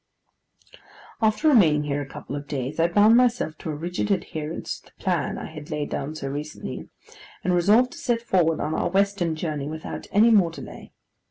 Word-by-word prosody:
After 220 +7 +2
remaining 165 - +5
here 145 0 -2
a 140 - -6
couple 140 - -7
of 145 0 -6
days 135 +1 -4
I 165 - +4
bound 210 +6 +5
myself 240 -10 +2
to - - -6
a 155 - -2
rigid 175 +6 -3
adherence 160 -5 -3
to - - -24
the - - -21
plan 175 -6 0
I - - -6
had 155 -2 -9
laid 150 -2 -3
down 145 +3 -3
so 140 -3 -5
recently, 145 +3 -6 0.5
and 180 - +1
resolved 210 +8 +4
to - - -10
set 235 -1 0
forward 165 -7 +2
on 155 - -2
our - - 0
western 195 -3 +1
journey 155 -3 -3
without 155 0 -6
any 220 +3 +5
more 195 -6 +5
delay. 165 - -10
165 Hz, 190 wpm, -24 LUFS, 150-205 Hz, 0.5 s, remaining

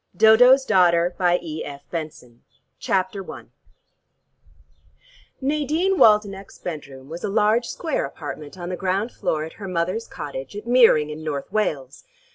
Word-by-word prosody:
DODO'S 245 +5 +6
DAUGHTER 175 -1 +3 1.7
CHAPTER 190 0 -2
I - - -10 1.9
Nadine 305 +7 0
Waldenech's 205 -2 +3
bedroom 140 -5 -8
was 165 +3 -8
a - - -1
large 215 +3 +2
square 320 -5 -2
apartment 150 +1 -8
on 175 -1 -6
the 180 - -3
ground 195 +5 -1
floor 155 -1 -2
at 160 - -8
her 195 - -5
mother's 185 +5 -2
cottage 140 +1 -7
at 205 - -7
Meering 230 -12 +4
in 155 +1 -8
North 145 -1 -4
Wales. 145 -11 -2
190 Hz, 120 wpm, -22 LUFS, 155-225 Hz, 1.9 s, DODO'S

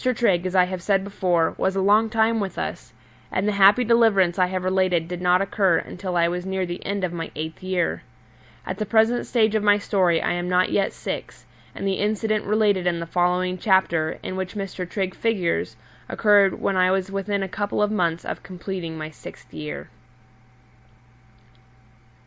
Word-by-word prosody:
Trigg, 185 -6 +1
as 185 - -4
I 185 - +6
have 180 0 -4
said 195 +1 +1
before, 180 -4 0
was 190 0 0
a - - 0
long 210 +3 +3
time 225 +1 +2
with 195 -2 -4
us, - - -5 0.4
and 195 +2 -1
the - - +2
happy 200 +4 +5
deliverance 215 -7 +3
I 180 - +4
have 185 0 -3
related 185 -3 +1
did 180 0 -6
not 180 +1 +3
occur 195 -3 +2
until 180 -1 -4
I 170 0 +3
was 175 +1 -3
near 190 0 -2
the 175 0 -6
end 200 -1 -3
of 175 -2 -1
my 165 -1 -5
eighth 160 +1 -6
year. 185 -2 -1 0.6
At - - -5
the 215 - -1
present 225 +3 +2
stage 220 -3 +2
of 220 - +1
my 205 0 +4
story 185 -5 +1
I - - -1
am 175 0 -2
not 180 0 +2
yet 195 - +1
six, - - -7 0.3
and 195 - -3
the 195 - -1
incident 215 0 0
related 205 -3 +2
in 170 -1 0
the 170 - -4
following 180 +1 0
chapter, 170 -6 +1
in 185 - -5
which 190 0 -4
Mr. 195 -3 -5
Trigg 190 -2 -2
figures, 195 -8 -1 0.3
occurred 205 -3 +3
when 195 - 0
I 185 0 +3
was 190 0 0
within 195 0 -2
a - - -3
couple 205 +2 -3
of 210 - 0
months 170 -5 -1
of - - -5
completing 180 -3 -6
my 155 0 -6
sixth - - -13
year. 150 -1 -6
190 Hz, 190 wpm, -23 LUFS, 180-205 Hz, 0.6 s, I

